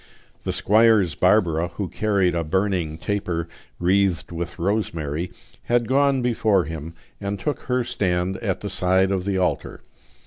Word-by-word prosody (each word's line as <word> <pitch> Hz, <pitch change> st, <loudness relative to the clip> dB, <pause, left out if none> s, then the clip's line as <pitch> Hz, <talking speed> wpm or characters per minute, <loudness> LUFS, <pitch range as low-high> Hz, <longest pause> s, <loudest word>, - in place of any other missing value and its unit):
The -, -, -2 dB
squire's 110 Hz, -4 st, +4 dB
Barbara, 90 Hz, -4 st, +2 dB
who 100 Hz, -, -2 dB
carried 100 Hz, -3 st, +1 dB
a 85 Hz, -1 st, 0 dB
burning 90 Hz, -2 st, 0 dB
taper 90 Hz, -3 st, -2 dB, 0.3 s
wreathed 95 Hz, -1 st, +1 dB
with 85 Hz, 0 st, -5 dB
rosemary, 85 Hz, -4 st, -2 dB, 0.3 s
had 120 Hz, -1 st, +1 dB
gone 135 Hz, -1 st, +3 dB
before 110 Hz, -5 st, +2 dB
him 80 Hz, +1 st, -7 dB, 0.2 s
and 100 Hz, 0 st, -3 dB
took 150 Hz, +8 st, -2 dB
her 125 Hz, 0 st, +2 dB
stand 95 Hz, -6 st, -1 dB
at 100 Hz, -6 st, -2 dB
the 100 Hz, -, -4 dB
side 95 Hz, 0 st, +2 dB
of 95 Hz, -2 st, -1 dB
the 100 Hz, -1 st, 0 dB
altar. 90 Hz, -1 st, -2 dB
95 Hz, 145 wpm, -23 LUFS, 85-105 Hz, 0.3 s, squire's